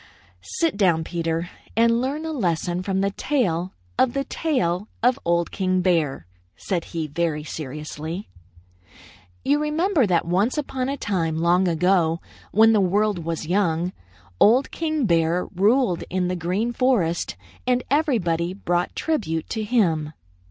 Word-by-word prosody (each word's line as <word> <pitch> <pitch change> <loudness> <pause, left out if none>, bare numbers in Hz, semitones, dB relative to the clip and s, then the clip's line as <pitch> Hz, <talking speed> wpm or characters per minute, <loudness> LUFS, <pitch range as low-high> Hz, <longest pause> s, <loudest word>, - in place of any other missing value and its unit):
"Sit 325 -10 +1
down, 175 -6 +3
Peter, 165 0 -2 0.3
and 230 +1 +4
learn 285 +5 -2
a 320 - -3
lesson 175 - -1
from 190 0 -1
the 200 0 +1
tale 190 - -1 0.2
of 250 -2 +3
the 275 - 0
tail 205 - -1 0.2
of 255 +2 +3
Old 170 0 +1
King 185 -1 0
Bear," 160 - +1 0.3
said 175 -4 -3
he 165 -2 -4
very 155 0 -2
seriously. 155 +4 -6 1.2
"You 290 +2 +3
remember 305 - +2
that 175 -3 +2
once 195 - +1
upon 265 -3 -2
a 280 - -2
time, 165 - -1
long 175 +3 +3
ago, 170 -1 +2 0.3
when 225 +2 +6
the 210 - +4
world 195 -1 +1
was 165 -1 -3
young, 175 -1 0 0.5
Old 245 +6 +5
King 310 -4 -1
Bear 170 -1 +2
ruled 205 0 +2
in 180 -1 0
the 180 - -1
Green 185 +8 -1
Forest, 225 -11 +1 0.3
and 250 0 +2
everybody 185 - +1
brought 175 -2 -1
tribute 180 - -1
to 220 - -2
him." 165 -10 +1
185 Hz, 145 wpm, -23 LUFS, 170-240 Hz, 1.2 s, when